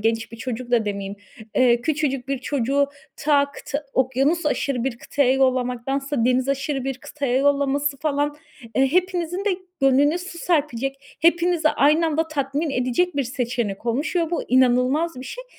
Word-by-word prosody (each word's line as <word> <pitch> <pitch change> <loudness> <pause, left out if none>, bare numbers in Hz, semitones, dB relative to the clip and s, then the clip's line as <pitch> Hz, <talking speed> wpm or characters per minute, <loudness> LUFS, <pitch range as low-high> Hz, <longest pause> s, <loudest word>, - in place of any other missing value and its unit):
genç 225 +1 -1
bir - - -8
çocuk 245 +1 -5
da 235 -3 +3
demeyeyim, 200 -1 -4 0.4
eee, 240 -2 +4
küçücük 275 -3 -1
bir 275 - -1
çocuğu 280 +1 0 0.3
ta 285 -1 +2
kıta 290 +1 -5
okyanusaşırı 270 0 +1
bir 240 -3 -2
kıtaya 270 -3 +1
yollamaktansa 260 0 0
denizaşırı 270 +2 0
bir 270 -1 -3
kıtaya 280 -4 -2
yollaması 280 0 +1
falan, 290 -1 -1 0.4
eee, 270 +3 +2
hepinizin 365 +1 0
de 415 - +2 0.3
gönlüne 280 +5 +4
su 355 -1 -8
serpecek, 280 -4 -2
hepinizi 340 -1 +3
aynı 310 +4 +3
anda 320 +1 0
tatmin 285 +1 -2
edecek 255 +7 0
bir 280 - +2
seçenek 240 -4 -3
olmuş 280 +9 -1
ve 335 -1 +1
bu 345 - -1
inanılmaz 255 +4 +2
bir - - -8
şey. - - -7
275 Hz, 150 wpm, -23 LUFS, 250-300 Hz, 0.4 s, eee